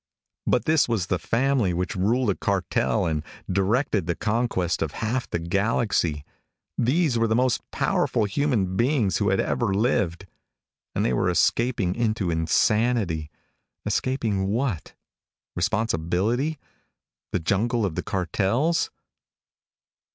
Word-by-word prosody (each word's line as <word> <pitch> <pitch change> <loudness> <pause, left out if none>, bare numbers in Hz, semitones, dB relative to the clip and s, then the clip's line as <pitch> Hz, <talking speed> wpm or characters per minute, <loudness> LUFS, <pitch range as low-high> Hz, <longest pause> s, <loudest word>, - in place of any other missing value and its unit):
But 125 - +2
this 155 -5 +3
Was 110 -6 0
the 90 -1 -1
family 120 -4 +1
which 90 +1 -2
ruled 110 +5 +2
a - - -2
cartel 95 -3 0
and 80 -2 0 0.3
directed 100 - +1
the 85 - 0
conquest 105 -6 -1
of 80 - -2
half 120 +3 -2
the - - -1
galaxy; 85 -4 0 0.5
these 130 0 +2
were 115 - +2
the 110 - +1
most 125 0 +2
powerful 110 - +1
human 105 -4 0
beings 115 - +2
who - - +1
had - - +2
ever - - 0
lived. 100 -5 0 0.7
And - - +1
they - - +1
were - - +1
escaping 115 -7 +1
into 110 -5 0
insanity. 85 0 +1 0.6
Escaping 110 -7 0
what? 110 - -2 0.6
Responsibility? 110 - 0 0.7
The - - 0
jungle 110 +6 +1
of 95 - -2
the - - -2
cartels? 105 - 0
105 Hz, 125 wpm, -25 LUFS, 90-120 Hz, 0.7 s, this